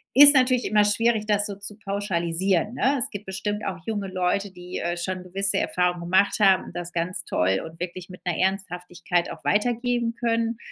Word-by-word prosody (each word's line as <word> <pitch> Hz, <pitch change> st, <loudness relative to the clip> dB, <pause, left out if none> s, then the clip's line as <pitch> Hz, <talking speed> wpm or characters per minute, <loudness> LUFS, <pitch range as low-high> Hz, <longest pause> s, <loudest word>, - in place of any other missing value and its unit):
Ist 285 Hz, +1 st, +10 dB
natürlich 255 Hz, -1 st, +3 dB
immer 210 Hz, 0 st, +3 dB
schwierig, 220 Hz, +1 st, +1 dB
das 205 Hz, -1 st, +1 dB
so 200 Hz, -, -6 dB
zu 200 Hz, +1 st, -2 dB
pauschalisieren, 190 Hz, 0 st, -1 dB
ne? 270 Hz, +2 st, +1 dB
Es -, -, 0 dB
gibt 205 Hz, +1 st, -8 dB
bestimmt 205 Hz, +2 st, -4 dB
auch 185 Hz, -1 st, -4 dB
junge 205 Hz, -3 st, -3 dB
Leute, 185 Hz, +2 st, -1 dB
die, 180 Hz, 0 st, -8 dB
äh, 175 Hz, +1 st, -2 dB
schon 185 Hz, +1 st, -3 dB
gewisse 195 Hz, +2 st, 0 dB
Erfahrungen 180 Hz, -2 st, 0 dB
gemacht 185 Hz, +4 st, +2 dB
haben 195 Hz, -3 st, +4 dB
und -, -, -12 dB
das 175 Hz, 0 st, -5 dB
ganz 170 Hz, 0 st, -3 dB
toll 95 Hz, +1 st, 0 dB
und 160 Hz, +1 st, -12 dB
wirklich 180 Hz, +1 st, -6 dB
mit 180 Hz, -, -13 dB
'ner 175 Hz, -3 st, -2 dB
Ernsthaftigkeit 180 Hz, -2 st, -2 dB
auch -, -, -10 dB
weitergeben 240 Hz, +2 st, 0 dB
können. 230 Hz, -1 st, -1 dB
195 Hz, 190 wpm, -24 LUFS, 180-215 Hz, -, Ist